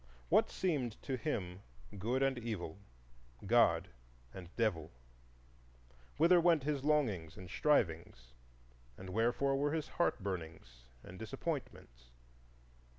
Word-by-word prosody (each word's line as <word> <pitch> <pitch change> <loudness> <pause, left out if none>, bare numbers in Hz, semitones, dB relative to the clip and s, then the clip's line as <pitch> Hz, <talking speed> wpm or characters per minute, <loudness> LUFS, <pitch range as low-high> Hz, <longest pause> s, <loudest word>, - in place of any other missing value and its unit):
What - - +4
seemed 140 - -1
to 135 - -2
him 100 - -3 0.4
good 125 +7 0
and 135 -1 +2
evil,—God - - -1 0.4
and 90 -2 -9
Devil? 95 -9 0 1.3
Whither 170 +3 +6
went 165 -4 +4
his 145 -2 -1
longings 115 - 0
and 95 - -9
strivings, 80 - 0 0.6
and 95 0 -8
wherefore 120 +6 +1
were 145 +2 0
his 160 -2 -2
heart 170 - 0
burnings 80 -10 -6 0.2
and 90 - -11
disappointments? 110 - -6
110 Hz, 105 wpm, -35 LUFS, -, 1.3 s, Whither